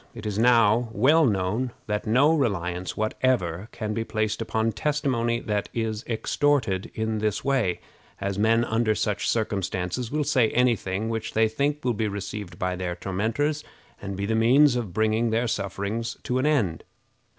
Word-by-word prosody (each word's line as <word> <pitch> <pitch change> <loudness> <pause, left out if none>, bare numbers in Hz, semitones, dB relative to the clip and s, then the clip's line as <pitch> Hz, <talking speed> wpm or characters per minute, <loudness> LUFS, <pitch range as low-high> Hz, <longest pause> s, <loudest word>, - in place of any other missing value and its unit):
It 110 -2 -8
is 105 -1 -2
now 115 -1 +4
well 150 +9 +4
known 105 +5 -1
that 105 0 -3
no 135 +8 +4
reliance 90 - -2
whatever 110 -5 0
can 110 -1 -4
be 115 +1 -1
placed 110 0 -2
upon 110 0 0
testimony 130 -5 0
that 105 -2 -2
is 110 -2 -2
extorted 115 -4 0
in 110 0 -1
this 105 +2 -1
way, 130 -10 +1 0.4
as 100 0 -2
men 115 +2 +3
under 110 -1 +1
such 105 -1 -1
circumstances 100 0 -2
will 150 +3 0
say 130 -6 +3
any 125 -1 +4
thing 95 +2 -3
which 110 -1 -3
they 110 0 +4
think 140 +6 -1
will 125 - +2
be 110 0 -1
received 100 -2 -6
by 90 -1 -1
their 90 -1 -3
tormentors, 115 - -1 0.4
and 100 -1 -5
be 100 - -2
the 110 - -1
means 125 +5 +5
of 115 -6 -3
bringing 110 +4 +1
their 115 +2 +1
sufferings 100 +2 -3
to 125 +1 -1
an 140 - +1
end. 105 - +1
110 Hz, 170 wpm, -25 LUFS, 100-125 Hz, 0.4 s, means